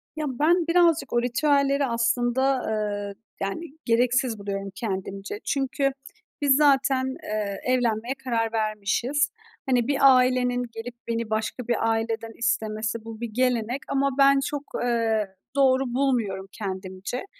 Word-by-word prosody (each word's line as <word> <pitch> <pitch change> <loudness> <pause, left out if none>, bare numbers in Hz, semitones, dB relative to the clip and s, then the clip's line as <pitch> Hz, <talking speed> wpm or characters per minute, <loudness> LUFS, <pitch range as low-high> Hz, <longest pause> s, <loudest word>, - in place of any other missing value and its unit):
Ya, 310 -1 -2
ben 335 +3 +3
birazcık 335 -2 +3
o 240 - +3
ritüelleri 280 +2 +2
aslında, 245 +2 +1
eee, 205 -2 -2 0.3
yani, 195 +12 -3 0.2
gereksiz 245 0 +2
buluyorum 195 -1 -4
kendimce. 195 -1 -4
Çünkü 275 0 0 0.5
biz 280 -2 +5
zaten, 270 -2 +3
eee, 210 -5 -3
evlenmeye 245 -1 0
karar 230 -3 0
vermişiz, 220 +6 0 0.4
hani, 245 -2 +2
bir 285 - +1 0.2
ailenin 250 -1 +2
gelip 235 +2 -7
beni 230 -1 -2
başka 220 +2 -2
bir 230 -1 +1
aileden 225 0 -1
istemesi 225 -2 -1
bu 225 0 -8
bir 235 - -3
gelenek 250 +1 0
ama 275 0 +2
ben 275 0 +6
çok, 290 -1 -3 0.2
eee, 225 -4 0 0.2
doğru 270 -1 +4
bulmuyorum 230 -8 0
kendimce. 190 - -5
240 Hz, 130 wpm, -25 LUFS, 215-270 Hz, 0.5 s, ben